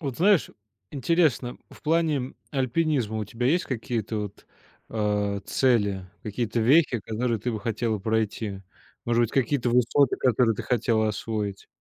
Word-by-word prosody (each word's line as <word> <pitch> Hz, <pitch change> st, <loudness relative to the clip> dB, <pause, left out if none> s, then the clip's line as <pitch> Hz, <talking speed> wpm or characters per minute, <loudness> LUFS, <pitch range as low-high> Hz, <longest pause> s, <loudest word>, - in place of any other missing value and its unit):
Вот 135 Hz, -6 st, -4 dB
знаешь, 195 Hz, -1 st, +3 dB, 0.4 s
интересно, 140 Hz, -3 st, +1 dB
в -, -, -16 dB
плане 155 Hz, -5 st, +1 dB, 0.2 s
альпинизма 130 Hz, -4 st, 0 dB
у 105 Hz, -, -2 dB
тебя 120 Hz, +4 st, -3 dB
есть 175 Hz, +6 st, +2 dB
какие-то 115 Hz, -3 st, -3 dB
вот, 105 Hz, -1 st, -7 dB, 0.4 s
а, 105 Hz, -2 st, 0 dB
цели, 100 Hz, -7 st, +1 dB, 0.2 s
какие-то 115 Hz, +2 st, -2 dB
вехи, 130 Hz, +1 st, +4 dB
которые 115 Hz, +3 st, -1 dB
ты 120 Hz, +3 st, -2 dB
бы 110 Hz, -, -4 dB
хотела 110 Hz, 0 st, -1 dB
пройти, 110 Hz, -2 st, -2 dB, 0.4 s
может 120 Hz, 0 st, +2 dB
быть, 115 Hz, -, 0 dB
какие-то 135 Hz, -2 st, +1 dB
высоты, 125 Hz, +2 st, +3 dB
которые 120 Hz, -2 st, +2 dB
ты -, -, -5 dB
хотела 115 Hz, -3 st, +1 dB
освоить? 105 Hz, -1 st, -3 dB
115 Hz, 140 wpm, -26 LUFS, 110-130 Hz, 0.4 s, вехи